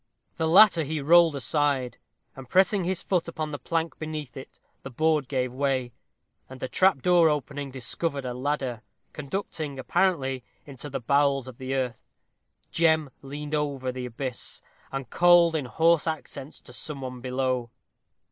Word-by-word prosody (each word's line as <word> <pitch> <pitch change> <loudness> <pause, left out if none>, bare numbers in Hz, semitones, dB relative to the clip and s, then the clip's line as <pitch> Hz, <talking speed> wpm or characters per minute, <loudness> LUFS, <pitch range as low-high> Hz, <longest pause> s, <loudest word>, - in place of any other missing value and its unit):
The 160 - 0
latter 185 +1 +7
he 155 +2 -3
rolled 165 +2 +5
aside, 140 0 0 0.4
and 135 -2 -11
pressing 190 0 +3
his 185 0 -1
foot 180 -3 0
upon 155 -2 -4
the 145 - -5
plank 165 0 -2
beneath 155 -4 -5
it, 135 - -11 0.2
the - - -8
board 155 +1 +1
gave 130 -2 -1
way, 130 -3 -1 0.6
and 130 0 -10
a - - -1
trap 185 -3 +3
door 175 -2 +5
opening, 145 -1 -3
discovered 135 +2 -3
a 125 - -3
ladder, 130 -3 -2 0.3
conducting, 150 -2 -5
apparently, 135 -3 0 0.2
into 140 +1 -8
the 135 - -3
bowels 140 +1 +2
of 130 -2 -11
the 130 +1 -3
earth. 125 -3 -2 0.7
Jem 160 -3 +2
leaned 145 +2 -7
over 140 -4 -1
the 125 0 -5
abyss, 125 +1 -5 0.3
and 135 -3 -5
called 175 -1 +6
in 150 -4 -1
hoarse 165 +5 +3
accents 155 -2 -5
to 125 - -15
some 140 +2 -5
one 125 -1 -6
below. 130 -1 -1
140 Hz, 155 wpm, -26 LUFS, 130-160 Hz, 0.7 s, latter